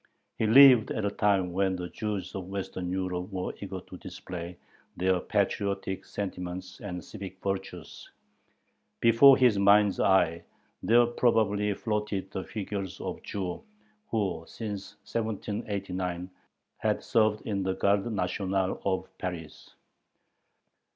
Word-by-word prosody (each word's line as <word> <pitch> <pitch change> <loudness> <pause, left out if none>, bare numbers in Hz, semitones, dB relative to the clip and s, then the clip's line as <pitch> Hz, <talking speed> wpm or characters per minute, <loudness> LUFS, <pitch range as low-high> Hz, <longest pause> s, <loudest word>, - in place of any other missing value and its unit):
He 110 - +2
lived 125 -1 +8
at 110 - -2
a 100 - 0
time 95 -4 +1
when 95 0 +1
the 90 -1 -4
Jews 100 -4 -4
of 95 -2 -5
Western 95 -2 -4
Europe 90 +1 -3
were 95 -1 -3
eager 95 -2 -5
to 90 - -11
display 90 0 -8 0.4
their 95 0 +2
patriotic 100 -1 -1
sentiments 90 -2 -5
and 90 -4 -6
civic 95 -3 -9
virtues. 95 -1 -5 0.9
Before 115 +4 +7
his 120 -6 +4
mind's 100 0 +5
eye 85 -4 +3 0.4
there 120 +2 +5
probably 110 -4 +2
floated 105 -4 -2
the 95 - -4
figures 100 -3 -5
of - - -5
Jews 95 -3 -4 0.5
who, 100 -7 -1
since 105 -3 -6
1789, 95 -5 -3 0.5
had - - 0
served 110 -1 +2
in 100 -3 -1
the 95 0 -1
garde 100 +4 +1
nationale 95 -1 -1
of 95 -1 -1
Paris. 85 -4 -7
100 Hz, 125 wpm, -28 LUFS, 95-105 Hz, 0.9 s, lived